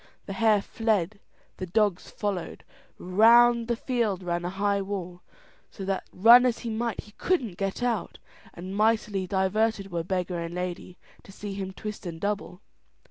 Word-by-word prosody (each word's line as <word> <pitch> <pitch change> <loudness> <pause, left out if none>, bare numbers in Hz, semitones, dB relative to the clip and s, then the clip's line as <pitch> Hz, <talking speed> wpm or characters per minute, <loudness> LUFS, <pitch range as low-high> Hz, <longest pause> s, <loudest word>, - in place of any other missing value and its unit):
The 195 - -5
hare 215 -1 +3
fled, 215 -3 -1 0.4
the 185 - -5
dogs 205 -1 +1
followed. 200 -5 -4 0.3
Round 230 +5 +5
the 240 - +1
field 225 -7 -1
ran 175 0 -2
a 175 - -2
high 200 +1 0
wall, 185 -3 -5 0.5
so 195 - -8
that 195 0 -2
run 235 +6 +8
as 245 -2 +1
he 230 - -2
might, 230 +1 -2
he 210 - -17
couldn't 255 - 0
get 195 +5 -3
out, 235 -4 -1 0.4
and 185 +3 -7
mightily 210 -3 +1
diverted 195 +1 0
were 170 -1 -2
beggar 180 0 -2
and 170 +1 -5
lady 180 0 -5 0.2
to - - -15
see 205 0 -7
him 195 -1 -4
twist 210 -1 -7
and 165 -1 -6
double. 200 -1 -3
200 Hz, 165 wpm, -27 LUFS, 185-220 Hz, 0.5 s, run